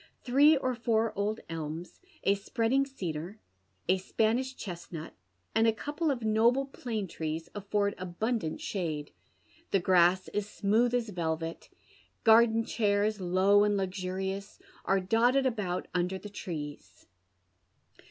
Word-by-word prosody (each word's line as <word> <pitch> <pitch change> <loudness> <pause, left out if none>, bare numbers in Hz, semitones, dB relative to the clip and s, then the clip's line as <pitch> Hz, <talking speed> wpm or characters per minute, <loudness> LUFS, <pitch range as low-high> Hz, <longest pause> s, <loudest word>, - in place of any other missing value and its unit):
Three 285 +5 +5
or 255 -1 -1
four 230 -2 0
old 205 +2 -1
tlms, 165 +1 -6 0.2
a 200 - +4
spreading 230 +6 0
cedar, 180 - -5 0.5
a 185 +2 +3
Spanish 230 +7 0
chestnut, 170 -5 -7 0.4
and 225 +1 +4
a - - +6
couple 295 +8 -2
of 255 -5 -1
noble 230 +5 +3
plane 230 -6 -4
trees 160 0 -4
alTord 205 0 0
abundant 185 0 -2
shade. 155 -7 -3 0.6
The 195 - +3
grass 180 0 +4
is 205 -1 -2
smoulli 225 +4 +2
as 235 -3 -1
velvet. 165 -3 -3 0.5
Garden 225 0 +6
chairs, 205 -1 +1
low 190 +3 +4
and 205 -1 +2
luxurious, 190 +1 -3 0.3
are 195 0 +3
dotted 240 +8 +3
about 210 -8 -1
under 180 +1 0
the 210 - -9
trees. 150 -7 -7
205 Hz, 125 wpm, -30 LUFS, 180-230 Hz, 0.6 s, a